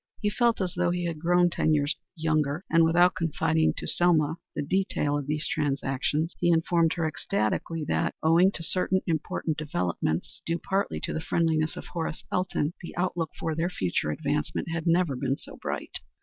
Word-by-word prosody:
He 210 - 0
felt 235 +1 +2
as 185 -1 -1
though 180 0 +1
he 175 0 -1
had 165 -2 -3
grown 175 +1 +3
ten 155 -2 +2
years 145 +1 +1 0.2
younger, 155 +1 0
and 165 0 +6
without 175 +2 +5
confiding 160 -1 +1
to - - -4
Selma 160 -3 +2 0.2
the - - -1
details 145 -3 0
of 140 - -6
these 150 +1 0
transactions 145 +2 -1
he 175 - +2
informed 165 0 +3
her 165 -2 -1
ecstatically 155 +3 -1
that, - - 0
owing 170 +4 +5
to 165 - -5
certain 185 +2 +1
important 160 -1 -1
developments, 90 - -2
due 165 0 -1
partly 195 +3 -1
to - - -3
the 160 - -2
friendliness 160 -1 +1
of - - -7
Horace 165 -2 -4
Elton, 180 -4 0
the 170 - -9
outlook 175 -3 -1
for 160 - -2
their 165 +3 0
future 90 - -1
advancement 150 - -2
had 165 0 -3
never 170 -4 +3
been 135 +1 -1
so - - -10
bright. - - -4
165 Hz, 180 wpm, -27 LUFS, 150-175 Hz, 0.2 s, and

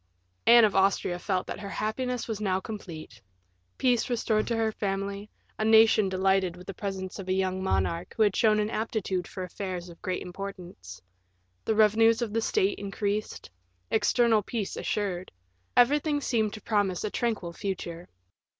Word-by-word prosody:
Anne 235 -1 +9
of 205 - 0
Austria 190 -2 +2
felt 185 0 -1
that - - -6
her 200 - -6
happiness 245 +4 -2
was 220 -2 -4
now 190 -2 +1
complete; 170 - -8 0.6
peace 250 -2 +2
restored 220 -3 0
to 235 - 0
her 220 -1 +1
family, 200 0 -3 0.3
a - - +1
nation 220 -2 +5
delighted 190 -1 +1
with 180 - -12
the 195 - -6
presence 190 0 -5
of 190 - -7
a - - +2
young 190 0 0
monarch 175 -2 -1
who 220 - +5
had 205 -3 +2
shown 215 -2 +4
an 210 +1 -1
aptitude 205 -5 -2
for 185 - -6
affairs 180 -1 -5
of 170 - -14
great 185 -1 -3
importance; 180 - -8 0.6
the 220 - +1
revenues 220 +1 +5
of 215 -3 -4
the 225 - +1
state 395 - +1
increased; 200 - -3 0.4
external 225 0 +3
peace 210 0 -4
assured; 185 -3 -2 0.5
everything 290 +4 +4
seemed 225 -6 0
to 215 - -8
promise 205 -5 0
a 210 - -2
tranquil 220 -8 -2
future. 175 -3 -5
200 Hz, 165 wpm, -28 LUFS, 185-220 Hz, 0.6 s, Anne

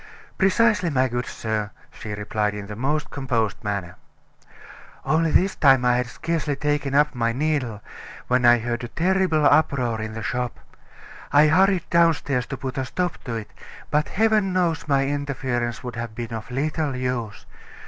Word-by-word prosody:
"Precisely, 205 -1 +3
my 130 -3 +2
good 120 0 -3
sir," 110 -2 -3 0.2
she 105 - -8
replied 105 0 -2
in 105 -1 -6
the 105 +1 -7
most 145 +6 -2
composed 120 -7 -2
manner. 100 -4 -4 1.1
"Only 160 +1 +2
this 185 +5 +2
time 135 -3 +4
I 125 0 +4
had 125 -1 -1
scarcely 155 +2 -2
taken 145 -1 -1
up 150 +1 +4
my 115 -2 0
needle 130 -6 -1 0.4
when 125 0 +2
I 120 0 +7
heard 120 +1 -3
a - - -3
terrible 175 +2 +1
uproar 135 -7 +2
in 110 0 -5
the 110 0 -6
shop. 120 +3 -3 0.7
I 150 +1 +6
hurried 185 +1 +3
downstairs 160 -6 +2
to 135 - -5
put 130 +1 -4
a 130 - -1
stop 180 +6 -3
to 120 -3 -3
it 110 -2 -6 0.4
but 150 +1 +2
heaven 215 -2 +2
knows 170 -4 0
my 135 -1 +2
interference 130 -4 -2
would 125 -1 -6
have 115 -2 -5
been 115 0 -5
of 110 -1 -6
little 145 +2 -1
use. 125 -4 -3
130 Hz, 170 wpm, -23 LUFS, 115-155 Hz, 1.1 s, I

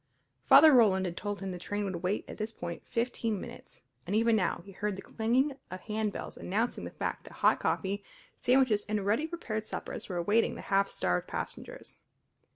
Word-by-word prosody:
Father 315 -2 +9
Roland 200 -6 +5
had 175 -1 -3
told 205 +1 -4
him 195 -1 -3
the 180 - -6
train 205 +3 -3
would 190 -3 -3
wait 185 +3 -1
at - - -9
this 215 +1 -2
point 170 -5 -6
fifteen 230 -3 -1
minutes, - - -11 0.2
and 200 - 0
even 230 +1 +4
now 180 -4 0
he 200 - -11
heard 205 +1 -2
the 195 - -7
clanging 245 +6 +1 0.2
of 185 0 -7
handbells 215 -1 -3
announcing 225 +6 -1
the - - -5
fact - - -4
that - - -11
hot - - +3
coffee, 200 +1 -1 0.3
sandwiches, 250 -5 +3
and 210 -2 -1
ready 225 +10 +1
prepared 245 -11 -4
suppers - - -6
were 180 - -3
awaiting 205 +7 +2
the - - -7
half 195 0 +4
starved 90 0 -1
passengers. - - -6
210 Hz, 190 wpm, -30 LUFS, 190-230 Hz, 0.3 s, Father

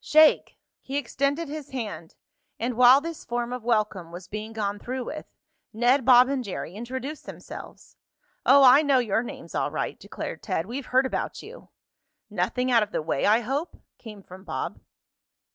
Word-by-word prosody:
Shake!" 310 0 +4 0.2
He 270 +1 -4
extended 280 +4 -1
his 300 0 -7
hand 205 -11 -6 0.4
and 240 +2 -1
while 250 +3 +7
this 330 0 -6
form 240 0 -3
of 250 -2 -6
welcome 215 -7 0
was 175 +1 -9
being 215 +3 -6
gone 205 -2 -3
through 255 +3 -4
with 305 - -7 0.5
Ned, 245 +3 +2
Bob 250 -1 +7
and 270 -2 -1
Jerry 185 -4 -6
introduced 260 +7 -6
themselves. - - -11 0.5
"Oh, 275 +1 +6
I 260 +3 +8
know 285 -3 +3
your 225 -3 +1
names 240 - -9
all - - 0
right," - - -4
declared - - -7
Ted. 185 -5 -2
"We've 250 +6 -6
heard 260 +1 +3
about 260 - -3
you." 475 +4 -12 0.6
"Nothing 250 +7 -1
out 235 -2 +5
of 210 -1 -2
the 155 - -2
way, 140 - 0
I 220 +3 +4
hope?" 280 +8 -3 0.2
came 210 -4 -11
from 185 +1 -13
Bob. - - -4
245 Hz, 175 wpm, -26 LUFS, 215-275 Hz, 0.6 s, I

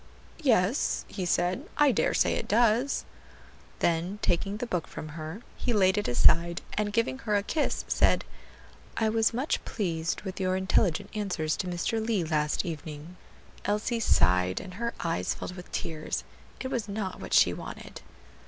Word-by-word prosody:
"Yes," 230 - +2
he 185 -3 -4
said, 175 +1 0
"I 295 -2 +6
dare 225 - +1
say - - +3
it - - -2
does." 235 +4 +3 0.8
Then 170 +4 +1
taking 195 +4 +1
the 245 - -3
book 180 -8 -2
from 155 - -7
her, 160 +7 -7
he 245 - -1
laid 190 -3 +4
it 205 - 0
aside, 170 +7 +4
and 210 -1 0
giving 230 +4 0
her 215 -5 0
a 200 - +2
kiss, 300 +8 -1
said, - - +3 0.7
"I 220 -1 +2
was 220 0 +3
much 255 +6 -1
pleased 165 -6 -2
with 190 0 -6
your 185 -1 +1
intelligent 190 0 +1
answers 185 -7 -1
to 185 - -3
Mr. 180 +6 -1
Lee, 220 -5 +1
last 155 +1 0
evening." 155 0 -6 0.5
Elsie 210 +3 0
sighed, 90 - +3
and 185 - -9
her 235 +4 -3
eyes 165 -1 -1
filled 180 - -6
with 180 -1 -10
tears. 155 -2 -3 0.4
It 260 - -3
was 230 -4 -1
not 200 -2 -3
what - - -2
she - - +6
wanted. - - -8
190 Hz, 165 wpm, -28 LUFS, 170-220 Hz, 0.8 s, I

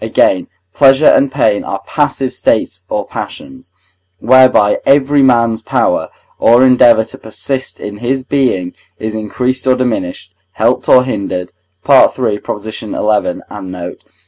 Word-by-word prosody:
Again, 95 - +1 0.3
pleasure 135 +1 +4
and 140 -2 +4
pain 130 -6 0
are - - -5
passive 130 -1 -1
states 90 -5 -1
or 105 -1 -2
passions, 265 - -9 0.5
whereby 125 -2 +4
every 140 +1 +3
man's 115 -4 +2
power - - -1 0.3
or 120 +3 +5
endeavour 125 -3 +5
to - - -11
persist 130 +4 -5
in 105 0 -7
his 130 +3 -2
being 125 -10 -1 0.2
is 110 0 -5
increased 125 +5 -3
or 130 - +4
diminished, 120 -8 -3 0.2
helped - - 0
or 125 - +6
hindered 95 -7 -4 0.3
(III. 130 -5 +3 0.3
xi. 110 - -7
and 105 -3 -3
note). 90 -1 -8
125 Hz, 130 wpm, -13 LUFS, 105-130 Hz, 0.5 s, or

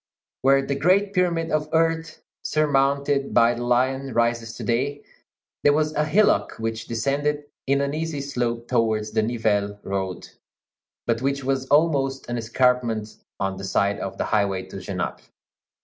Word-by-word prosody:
Where 135 0 +4
the 140 - -1
great 185 +8 +2
pyramid 170 -3 +1
of 155 0 0
earth, 165 0 0 0.2
surmounted 140 -1 +1
by 120 0 +5
the 120 0 -5
lion, 130 +1 0
rises 115 -1 0
to - - -7
day, 135 +5 -1 0.6
there 145 - +5
was 155 +1 +1
a 150 0 +1
hillock 200 +8 +3
which 115 0 -4
descended 140 +5 -1 0.2
in 140 +1 +2
an 140 0 -1
easy 160 -1 -3
slope 120 -4 -2
towards 110 -3 +1
the 110 0 +2
Nivelles 105 -3 0
road, 95 -1 -3 0.8
but 115 0 0
which 140 +1 -1
was 135 0 -1
almost 140 -3 +2
an 120 0 -2
escarpment 115 -2 +1 0.2
on 95 -1 -2
the 95 - -7
side 100 +1 +1
of 95 - -5
the - - -1
highway 100 -3 0
to - - -8
Genappe. - - -4
130 Hz, 155 wpm, -24 LUFS, 115-145 Hz, 0.8 s, by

